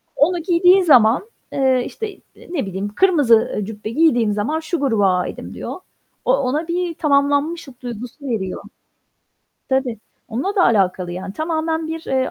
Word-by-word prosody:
onu 345 Hz, +4 st, +2 dB
giydiği 360 Hz, +2 st, +5 dB
zaman, 255 Hz, -, +4 dB, 0.2 s
eee, 260 Hz, -2 st, +2 dB
işte, 445 Hz, -, -5 dB
eee, -, -, -19 dB, 0.3 s
ne 285 Hz, -, -1 dB
bileyim 195 Hz, +2 st, -4 dB
"Kırmızı" 305 Hz, -11 st, +5 dB, 0.2 s
ııı 205 Hz, -, -2 dB
"...cübbe 215 Hz, 0 st, -7 dB
giydiğim 240 Hz, -6 st, +3 dB
zaman 220 Hz, +10 st, -1 dB
şu 325 Hz, +1 st, -3 dB
gruba 225 Hz, -8 st, +2 dB
aitim." 180 Hz, -, -5 dB
diyor. -, -, -6 dB, 0.5 s
O -, -, +3 dB
ona 300 Hz, -, -1 dB
bir 350 Hz, 0 st, -1 dB
"Tamamlanmışlık" 285 Hz, -1 st, 0 dB
duygusu 245 Hz, +4 st, -8 dB
veriyor. 190 Hz, -5 st, -3 dB, 1.1 s
Tabii. 260 Hz, -4 st, 0 dB, 0.3 s
Onunla 270 Hz, -, -2 dB
da 360 Hz, -, +5 dB
alakalı 185 Hz, -5 st, +1 dB
yani. 185 Hz, +2 st, -6 dB
Tamamen 320 Hz, +3 st, -2 dB
bir, 325 Hz, 0 st, -4 dB
eee, 260 Hz, -1 st, 0 dB
275 Hz, 150 wpm, -20 LUFS, 225-325 Hz, 1.1 s, giydiği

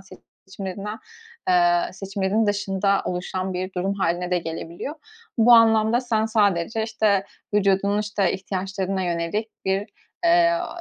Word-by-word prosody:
seçimlerinden, 195 Hz, +2 st, -8 dB, 0.5 s
eee, 350 Hz, -1 st, +3 dB
seçimlerin 195 Hz, +2 st, -1 dB
dışında 200 Hz, -1 st, +1 dB
oluşan 185 Hz, +1 st, -3 dB
bir 185 Hz, +1 st, -4 dB
durum 190 Hz, +2 st, -1 dB
hâline 180 Hz, -2 st, -1 dB
de 180 Hz, -, +2 dB
gelebiliyor. 165 Hz, -, -6 dB, 0.4 s
Bu 235 Hz, +2 st, +6 dB
anlamda 225 Hz, 0 st, +5 dB
sen 225 Hz, -3 st, 0 dB
sadece, 210 Hz, -1 st, +1 dB
işte, 215 Hz, -3 st, +1 dB, 0.3 s
vücudunun, 200 Hz, 0 st, +2 dB
işte, 205 Hz, -3 st, 0 dB
ihtiyaçlarına 190 Hz, 0 st, -3 dB
yönelik 175 Hz, +5 st, -2 dB, 0.2 s
bir, 190 Hz, 0 st, +1 dB, 0.5 s
eee, 340 Hz, 0 st, +5 dB
ııı, 345 Hz, -, -2 dB
200 Hz, 120 wpm, -23 LUFS, 190-220 Hz, 0.5 s, Bu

